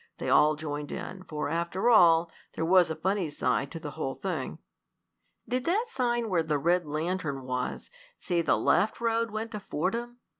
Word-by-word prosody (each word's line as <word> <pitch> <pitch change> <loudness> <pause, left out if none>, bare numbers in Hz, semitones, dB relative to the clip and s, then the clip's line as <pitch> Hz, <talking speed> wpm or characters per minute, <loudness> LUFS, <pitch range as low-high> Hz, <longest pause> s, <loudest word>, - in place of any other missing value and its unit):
They - - -3
all 150 +1 +5
joined 150 -1 -5
in, 185 +1 -6
for, 155 -3 -3
after 170 +6 -1
all, 165 -5 +6 0.2
there 160 - -1
was 180 0 +5
a 160 - -2
funny 185 +1 -1
side 135 -1 0
to 165 - -7
the 150 -2 -6
whole 135 -4 -4
thing. 190 -2 -4 0.9
"Did 250 +2 -1
that 430 +8 +1
sign 240 - 0
where 180 -5 +2
the 155 -2 0
red 170 +3 +1
lantern 155 -2 -2
was 125 -1 -4 0.3
say 175 -2 0
the - - +2
left 215 - +2
road 230 0 +1
went 220 +2 -4
to 210 - -4
Fordham?" 230 +8 -3
175 Hz, 180 wpm, -28 LUFS, 155-215 Hz, 0.9 s, all